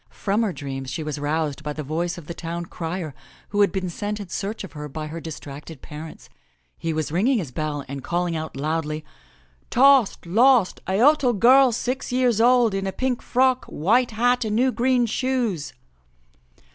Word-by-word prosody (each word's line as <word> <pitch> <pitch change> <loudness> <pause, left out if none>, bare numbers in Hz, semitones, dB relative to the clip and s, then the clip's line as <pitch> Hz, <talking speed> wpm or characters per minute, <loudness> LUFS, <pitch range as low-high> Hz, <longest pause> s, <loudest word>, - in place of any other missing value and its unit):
From 205 +2 -1
her 220 -4 +1
dreams 135 -4 -6
she 145 +4 -4
was 150 -1 -4
roused 150 0 -1
by 150 -1 -4
the 155 - -5
voice 170 +4 -2
of 170 - -10
the 170 - -6
town 170 0 -5
crier 165 -2 -5 0.4
who 205 0 +1
had 200 - +4
been 190 -2 -2
sent 205 +4 -4
in 200 -3 -7
search 205 +5 -4
of 195 - -8
her 150 -1 -7
by 155 +2 -5
her 160 +2 -6
distracted 150 -1 -9
parents. 155 +1 -9 0.5
He 165 - -3
was 155 -1 -2
ringing 225 - +2
his 165 - -4
bell 150 0 -3
and 135 0 -6
calling 175 +3 -1
out 160 -3 -5
loudly, 155 +1 -2 0.6
*Tost! 265 -6 +4
Lost! 230 +3 +4
A 190 - -1
Uttle 255 -1 +4
girl 260 +4 +6
six 250 +3 -3
years 245 -3 +2
old 240 -2 +4
in 195 0 -2
a - - -1
pink 255 +3 -1
frock, 255 0 +2
white 235 +11 +2
hat 245 +2 +2
and 215 -1 -1
new 255 +3 +3
green 250 0 +2
shoes!' 230 - -1
185 Hz, 185 wpm, -23 LUFS, 155-240 Hz, 0.6 s, girl